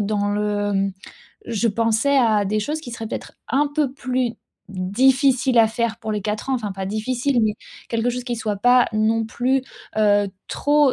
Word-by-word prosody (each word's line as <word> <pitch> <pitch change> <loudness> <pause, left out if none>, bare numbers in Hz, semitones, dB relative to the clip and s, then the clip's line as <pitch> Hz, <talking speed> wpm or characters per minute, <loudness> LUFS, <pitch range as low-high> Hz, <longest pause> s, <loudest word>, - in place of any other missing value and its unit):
dans 205 0 0
le, 205 0 0
hem, 195 0 0 0.5
je 230 0 0
pensais 230 +6 +2
à 220 -5 +3
des 215 +2 0
choses 300 +8 -3
qui 265 -6 -9
seraient 225 -1 -6
peut-être - - -6 0.2
un 285 +4 +2
peu 290 -4 +1
plus 255 -3 -1 0.4
difficiles 250 +6 +2
à 225 - +7
faire 230 0 -2
pour 220 -2 -4
les 210 - -2
4 210 +5 -3
ans, 265 - +2
enfin 215 -5 -3
pas 190 0 -5
difficiles 245 +5 0
mais 210 -1 +1 0.3
quelque 230 +1 0
chose 250 0 -4
qui 245 -2 -3
soit 215 -2 -2
pas 245 +4 +5
non 220 +1 +1
plus, 255 +3 0 0.3
heu, 205 -1 +3 0.2
trop, 290 -2 +3
225 Hz, 185 wpm, -22 LUFS, 210-255 Hz, 0.5 s, à